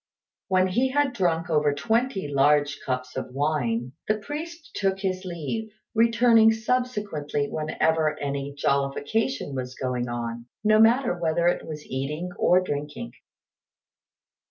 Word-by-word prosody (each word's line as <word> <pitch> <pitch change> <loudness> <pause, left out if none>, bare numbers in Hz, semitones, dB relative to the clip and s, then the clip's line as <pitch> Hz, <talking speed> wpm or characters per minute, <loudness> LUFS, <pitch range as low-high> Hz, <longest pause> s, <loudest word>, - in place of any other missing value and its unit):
When 185 -1 +3
he 250 +8 +2
had 285 0 +1
drunk 175 -5 0
over 150 -2 +2
twenty 220 - 0
large 145 +1 +3
cups 130 0 -3
of - - -4
wine, 130 -5 0 0.2
the 215 - +2
priest 315 +8 -7
took 195 -1 0
his 185 -1 -2
leave, 180 +6 -4 0.2
returning 230 0 +5
subsequently 210 - -1
whenever 155 0 +1
any 140 0 -3
jollification 140 - 0
was 130 -1 -4
going 125 -2 -2
on, 120 0 -4 0.2
no 215 0 +5
matter 235 +1 +5
whether 170 -1 0
it 175 - 0
was 150 -2 -7
eating 150 +7 -4
or 180 +1 +5
drinking. 150 +7 -5
165 Hz, 130 wpm, -25 LUFS, 140-220 Hz, 0.2 s, returning